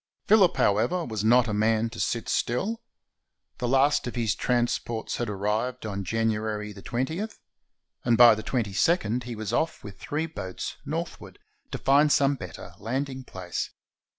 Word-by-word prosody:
Phillip, 200 -4 +5
however, 160 - +2
was 110 -3 -3
not 120 +2 +5
a 105 - -2
man 110 +2 +2
to 115 - -9
sit 115 +3 -1
still. 205 - -1 0.8
The 125 - -1
last 135 +2 +3
of 120 - -5
his 115 -4 +1
transports 120 -2 -1
had 120 -3 -2
arrived 105 +5 -2
on 100 -2 -3
January 110 0 -1
20, 130 - -3 0.8
and 120 -1 +3
by 120 -1 +9
the 110 - -4
2 - - -8
2d 115 - +1
he 120 -1 -5
was 110 -2 -4
off 165 +1 0
with 100 -2 -10
three 155 +2 -2
boats, 95 - -6
northward, 165 +3 -5 0.3
to - - -4
find 145 +2 +4
some 140 0 +4
better 90 -11 -8
landing 130 +3 -3
place. 90 -7 -5
120 Hz, 155 wpm, -27 LUFS, 105-135 Hz, 0.8 s, by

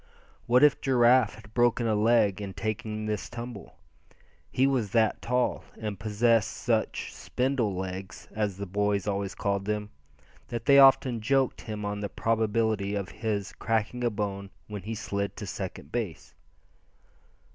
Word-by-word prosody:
What 125 +3 +5
if 150 -2 +5
Giraffe 125 -3 +4
had 110 -1 -15
broken 120 -1 +2
a 110 - +2
leg 105 -2 +3
in 100 -2 -6
taking 110 0 -3
this 105 -1 -3
tumble? 120 -3 -8 0.7
He 130 - +2
was 130 -6 +1
that 110 -2 +2
tall, 125 +1 0 0.2
and 105 -3 -4
possessed 110 +1 +2
such - - -1
"spindle 125 -6 -1
legs," 95 0 -6
as 105 -3 -2
the 100 - -4
boys 100 +1 0
always 100 -1 -2
called 100 -1 -1
them, 105 0 -2 0.6
that 115 -1 -5
they 140 0 +7
often 135 -3 +6
joked 135 +3 +1
him 105 -2 -5
on 105 0 -3
the 100 0 -3
probability 110 -2 0
of 100 -2 -3
his 105 -2 -3
cracking 115 +2 -1
a 120 - +3
bone 100 -2 -4 0.2
when 105 -2 -6
he 110 +4 -5
slid 100 -4 -3
to - - -6
second 70 - -6
base. 105 -10 -4
110 Hz, 155 wpm, -28 LUFS, 100-120 Hz, 0.7 s, they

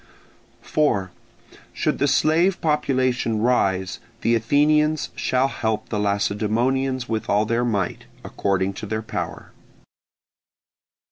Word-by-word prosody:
4. 100 -12 0 0.6
Should - - -1
the 140 - +2
slave 165 +6 +3
population 130 -7 0
rise, 95 -5 +1 0.2
the 115 - +2
Athenians 150 +6 +2
shall 130 +1 +1
help 110 -5 -2
the 105 - -2
Lacedaemonians 115 +6 0
with 110 -1 -3
all 105 +1 +3
their 115 +2 0
might, 100 -7 -2 0.2
according 95 0 -1
to 105 - -7
their 110 +1 -3
power. - - -5
115 Hz, 110 wpm, -23 LUFS, 105-135 Hz, 0.6 s, slave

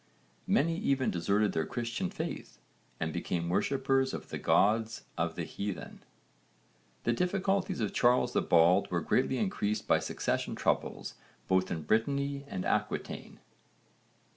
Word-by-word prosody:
Many 165 +3 +2
even 135 -10 +1
deserted 100 +4 +1
their 80 -1 -1
Christian 120 +8 -2
faith 170 -3 -6 0.4
and - - -2
became 85 -1 -2
worshippers 135 +6 +1
of - - -8
the - - -4
gods 110 +2 +2
of - - -1
the - - -3
heathen. 100 -1 -5 1.0
The 120 - +2
difficulties 190 0 0
of 105 - -1
Charles 125 +1 +3
the - - +3
Bald 90 +4 +4
were 85 -1 0
greatly 130 +6 +1
increased 105 - -1
by 80 - +4
succession 80 - -2
troubles - - -1 0.3
both 95 0 +2
in 80 - -3
Brittany 140 - 0
and 95 -8 -4
Aquitaine. - - -2
115 Hz, 135 wpm, -31 LUFS, 95-140 Hz, 1.0 s, Bald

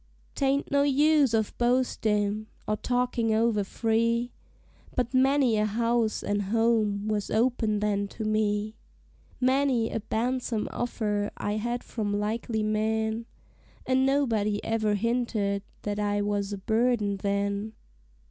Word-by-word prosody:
'Tain't 275 0 0
no 280 0 +4
use 290 -1 +4
of 220 -2 0
boastin', 215 -4 +1 0.2
or 215 - +1
talkin' 245 0 0
over 220 -1 +2
free, 230 +3 0 0.6
But 245 0 -1
many 260 -3 +3
a 210 0 +2
house 230 +1 0
an' 205 0 0
home 220 -2 +1
was 210 -1 -1
open 220 -2 +1
then 200 -1 0
to 220 +2 -6
me; 215 0 0 0.7
Many 260 -2 +2
a - - -1
ban'some 235 0 -1
offer 210 -4 -1
I 205 +1 -2
had 240 +3 -2
from 205 -3 -2
likely 220 +1 -2
men, 220 +1 -1 0.6
And 260 0 +2
nobody 230 -7 +1
ever 220 -2 0
hinted 220 -3 0 0.2
that 205 0 -2
I 205 0 0
was 205 -1 -1
a 205 - -3
burden 220 0 +1
then. 200 +2 -1
220 Hz, 130 wpm, -27 LUFS, 210-240 Hz, 0.7 s, no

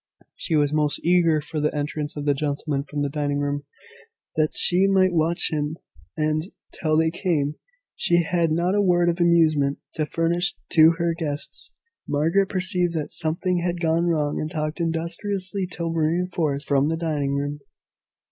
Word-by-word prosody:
She 165 - -2
was 145 -1 +2
most 150 -1 +1
eager 170 -3 +3
for 150 +1 -5
the 150 +1 +1
entrance 150 0 -3
of 145 - -4
the 145 - +3
gentlemen 140 0 -2
from 145 0 -4
the - - +1
dining 145 0 -2
room, 145 0 -2 0.7
that 155 -1 0
she 185 +2 +4
might 190 -2 +3
watch 165 +1 +2
him 150 0 -2 0.4
and, 155 0 +1 0.3
till 155 -2 0
they 160 0 +2
came, 160 -5 -1 0.4
she 175 0 +2
had 165 -1 0
not 170 +4 +1
a 205 - +2
word 175 -3 +3
of 170 +1 -2
amusement 155 -5 +3 0.2
to 155 -2 -2
furnish 170 +4 0 0.2
to 160 0 +6
her 170 -1 0
guests. 160 - -4 0.4
Margaret 165 +7 +1
perceived 180 -2 +3
that 150 -2 -3
something 175 +3 +1
had 175 0 -2
gone 165 +1 +1
wrong 150 -3 0
and 155 - -3
talked 155 0 -3
industriously 185 +4 -2
till 170 -2 -4
reinforced 160 -3 -1
from 140 0 +2
the 165 +1 -1
dining 150 -4 -1
room. 145 +1 -3
160 Hz, 165 wpm, -23 LUFS, 150-175 Hz, 0.7 s, to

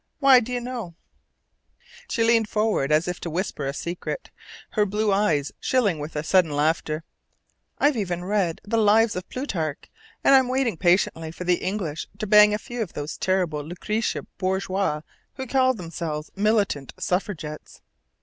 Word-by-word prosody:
Why, 275 -3 +7
do 245 +1 -6
you 245 - -1
know" 240 -8 -6 1.1
she 230 - +1
leaned 225 -2 +3
forward, 210 -10 +1
as 155 +3 +3
if 180 0 -3
to 170 - -5
whisper 165 -4 -3
a - - 0
secret, 175 - -5 0.4
her 210 - +2
blue 210 +1 0
eyes 195 -9 +1
shilling 210 -11 +1
with 150 +2 -6
a 150 - -2
sudden 180 0 +3
laughter 155 +1 0 0.7
"I've 290 -1 +3
even 180 -5 -2
read 190 -4 0
the 225 +2 0
'Lives' 220 +1 +4
of 180 0 -6
Plutarch, 165 - -4 0.3
and - - +6
I'm 265 -2 +6
waiting 255 -4 0
patiently 175 -2 +2
for 165 +3 -7
the 180 0 +2
English 185 -6 -3
to - - -3
bang 210 0 +7
a 210 - +1
few 240 +2 -6
of 205 - -4
those 145 +1 -5
terrible 180 -6 0
Lucretia 210 +8 -2 0.2
Borgias 190 -4 -1 0.3
who 265 - -5
call 260 0 +2
themselves 165 -4 -5
militant 200 - 0
suffragettes!" 175 -5 -4
190 Hz, 160 wpm, -24 LUFS, 160-220 Hz, 1.1 s, Why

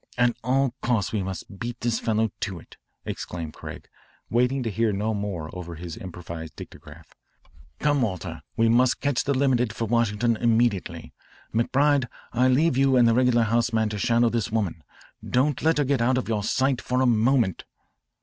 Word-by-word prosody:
"At 120 -1 +3
all 130 +1 +1
costs 115 -5 0
we 105 - 0
must 95 +1 -6
beat 120 +1 -5
this 115 -1 0
fellow 110 -1 0
to 95 -4 -3
it," - - -17 0.3
exclaimed 85 -3 -5
Craig, - - -9 0.4
waiting 125 +3 +2
to 115 - -2
hear 115 +2 +1
no 105 +3 -1
more 100 -7 -4
over 85 -2 -7
his 85 0 -7
improvised 85 -3 -8
dictograph. - - -12 0.6
"Come, 145 -2 +1
Walter, 95 -7 -3 0.2
we 115 - +4
must 120 +2 +3
catch 140 -3 0
the 140 0 0
limited 125 -4 +2
for 115 - -2
Washington 115 0 +1
immediately. 110 -8 0 0.4
McBride, 135 +3 +2 0.3
I 125 +2 +3
leave 130 +2 +3
you 135 -1 +4
and 120 -1 +6
the 115 - +4
regular 125 -1 +3
house 115 +2 +1
man 110 -1 +2
to 105 -1 -4
shadow 115 +3 +3
this 115 -4 -2
woman. 95 -8 -2 0.4
Don't 135 +2 +1
let 160 0 +2
her 145 - +3
get 135 -2 +1
out 125 +2 +2
of 130 - -2
your 110 -2 -1
sight 130 +3 +1
for 125 0 -1
a 130 - +3
moment." 120 -3 +2
115 Hz, 180 wpm, -25 LUFS, 105-125 Hz, 0.6 s, and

